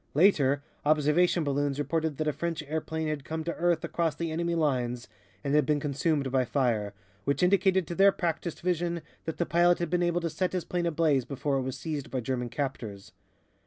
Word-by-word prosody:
Later, 145 -5 +4 0.2
observation 155 +3 +3
balloons 140 -1 0
reported 155 +1 -1
that 155 - -1
a 150 - +1
French 165 -1 -3
airplane 160 +1 -3
had 150 -2 -3
come 160 +2 -4
to 170 +1 -2
earth 170 -1 +1
across 165 -3 -1
the 165 +1 -3
enemy 170 +1 -1
lines 125 -6 0 0.4
and 140 -1 -1
had 150 0 +5
been 150 +2 +1
consumed 145 -1 0
by 130 -1 +3
fire, 115 -6 0 0.3
which 140 +5 0
indicated 190 0 +3
to 170 - -5
their 195 +3 +6
practised 170 -2 -3
vision 170 -1 -1 0.2
that 160 - -4
the 170 - +1
pilot 175 +1 +4
had 170 -2 -3
been 180 -1 +2
able 175 0 +1
to 170 - -1
set 180 +4 -1
his 180 -2 -2
plane 175 -1 -1
ablaze 155 -5 +2
before 140 +1 -2
it - - 0
was 130 0 -4
seized 150 -4 -4
by 130 - -2
German 125 0 -2
captors. 115 -7 -5
155 Hz, 200 wpm, -28 LUFS, 140-170 Hz, 0.4 s, their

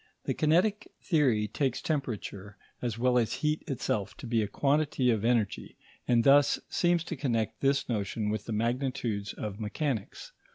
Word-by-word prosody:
The - - -1
kinetic 180 +7 +2 0.2
theory 130 - +2
takes 130 +1 -1
temperature, 105 -8 -4 0.2
as 120 -3 -2
well 125 +1 +3
as 115 - 0
heat 150 +1 +1
itself, 110 - -2
to 140 - -9
be 115 -1 +1
a 105 - -1
quantity 140 -1 +1
of 110 -2 0
energy, 115 -4 0 0.3
and 120 -2 +4
thus 140 +2 +5
seems 175 -1 +2
to 170 - -5
connect 115 -5 -1
this 140 0 +2
notion 105 -1 -1
with 105 -1 -3
the - - -5
magnitudes 115 -2 -1
of 105 -1 -6
mechanics. 110 +1 -3
120 Hz, 160 wpm, -29 LUFS, 110-140 Hz, 0.3 s, thus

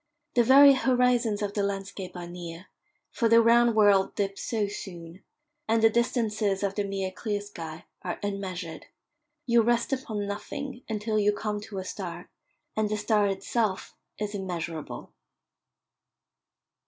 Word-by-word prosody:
The 240 - +4
very 275 +3 +8
horizons 250 -5 +2
of 200 -1 -2
the 205 - 0
landscape 195 -1 -4
are 175 - -6
near, 175 0 -8 0.5
for 230 -3 +1
the 230 +1 +7
round 235 0 +5
world 205 -3 +4
dips 195 -1 -2
so 215 -3 -1
soon; 175 -3 -8 0.4
and 225 0 +2
the 225 - +7
distances 215 -4 0
of 200 -1 0
the 205 - -1
mere 195 -1 -3
clear 205 +1 -3
sky 165 -6 -8 0.2
are 175 - -4
unmeasured 185 -4 -4 0.6
you 235 -1 +4
rest 240 +3 +1
upon 220 -6 -3
nothing 240 +6 -5
until 215 0 -1
you 205 0 +4
come 210 0 -3
to 205 -1 -8
a 190 - -3
star, - - -6 0.4
and 215 -1 +1
the 215 - -1
star 210 -1 +2
itself 195 +1 -1 0.2
is 210 -1 -3
immeasurable. 170 -5 -5
205 Hz, 145 wpm, -27 LUFS, 195-230 Hz, 0.6 s, very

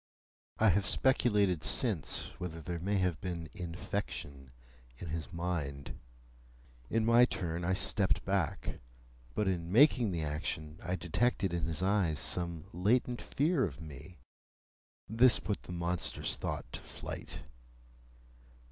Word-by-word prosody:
I 110 - +5
have 95 +1 +2
speculated 105 -8 +3
since, - - +1
whether 85 -3 -5
there 85 +2 -4
may 100 +4 0
have 90 -5 0
been 85 -3 -4
infection 85 -6 -5 0.5
in 85 - -7
his 80 +2 -4
mind. 85 -6 -3 0.9
In 115 -1 +1
my 120 +2 +7
turn, 85 -7 -3
I 95 +2 +2
stepped 95 0 +1
back. 95 -5 -1 0.6
But 105 - +1
in 85 -2 -1
making 120 -2 +5
the 85 -3 -2
action, 75 +1 -3
I 90 +1 -1
detected 95 +2 0
in 85 -1 0
his 85 +1 -2
eyes 95 -5 +2
some 85 -1 -1
latent 120 +7 +1
fear 150 0 +1
of 75 -10 -3
me. 80 +2 -10 0.9
This 115 +3 +5
put 105 - -3
the - - -10
monstrous 85 0 -1
thought - - -3
to - - -4
flight. - - -7
90 Hz, 130 wpm, -33 LUFS, 80-105 Hz, 0.9 s, my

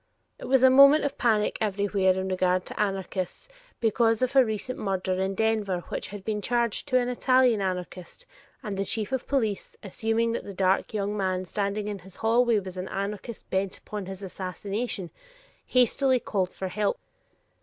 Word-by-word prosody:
It - - -7
was 265 -1 +3
a 260 - +8
moment 275 +3 +7
of 285 - -3
panic 215 -3 +2
everwhere 200 -2 +1
in 190 0 -3
regard 185 -1 +1
to - - -8
anarchists 195 - -2 0.3
because 225 +1 +2
of 255 +2 -1
a 265 - +8
recent 220 +2 -4
murder 190 -2 -1
in 190 0 -1
Denver 210 -4 0
which - - -4
had 200 -1 -9
been 210 -1 -1
charged 235 -1 0
to 255 - +3
an 245 -1 +1
Italian 250 -2 +3
anarchist, 185 - -5 0.4
and 210 -4 -4
the 195 - 0
chief 215 +2 -3
of 265 -2 -2
police, 220 -8 -1
assuming 225 +3 0
that 230 - -3
the 200 - -8
dark 190 0 +1
young 205 0 -1
man 185 -2 -1
standing 200 +2 -2
in 205 -1 -4
his 185 0 -13
hallway 230 +1 +3
was 190 -2 -5
an 185 +1 -4
anarchist 205 +3 -5
bent 190 0 0
upon 205 -3 -7
his 190 +1 -7
assassination, 195 +1 -4 0.6
hastily 255 +1 +3
called 190 -5 -1
for 190 - -5
help. 210 +2 0
205 Hz, 175 wpm, -27 LUFS, 190-235 Hz, 0.6 s, a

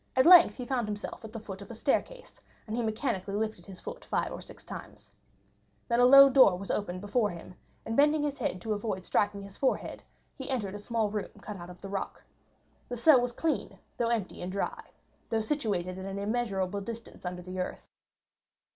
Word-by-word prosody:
At 260 - +5
length 350 0 +9
he 250 - -5
found 245 -3 -1
himself 205 +1 -5
at 220 - -8
the 225 - -6
foot 195 -2 -8
of 200 - -10
a 230 - -7
staircase, - - -2 0.3
and 220 - -4
he 240 - 0
mechanically 215 -3 -2
lifted 215 -5 -3
his 190 -2 -10
foot - - -8
five - - -1
or - - -6
six - - -11
times. - - -10 0.8
Then 235 -1 +2
a 245 - +7
low 275 +1 +10
door 260 -9 +6
was 195 +1 -4
opened 185 -3 -2
before 210 +1 +1
him, 175 0 -9 0.3
and 225 - -2
bending 295 +2 +4
his 290 -1 -2
head 180 - -2
to 220 +2 -1
avoid 205 -3 -3
striking 205 -1 +1
his 200 0 -12
forehead 270 - 0 0.3
he 265 0 -7
entered 215 -8 -2
a 205 - -6
small 220 0 -1
room 210 -1 -3
cut 210 -2 -7
out 175 0 -9
of 180 0 -12
the 195 - -6
rock. 195 0 -4 0.7
The 245 - -4
cell 260 +1 +6
was 245 0 -1
clean, 315 +6 -2 0.2
though 235 - +1
empty, 225 -5 -2
and 180 +1 -4
dry, 200 - -3 0.4
though 225 - +1
situated 200 -8 -2
at 190 - -6
an 195 0 -4
immeasurable 200 -3 -1
distance 230 +3 -8
under 180 0 -5
the 185 +1 -6
earth. 180 - -4
215 Hz, 210 wpm, -30 LUFS, 195-245 Hz, 0.8 s, low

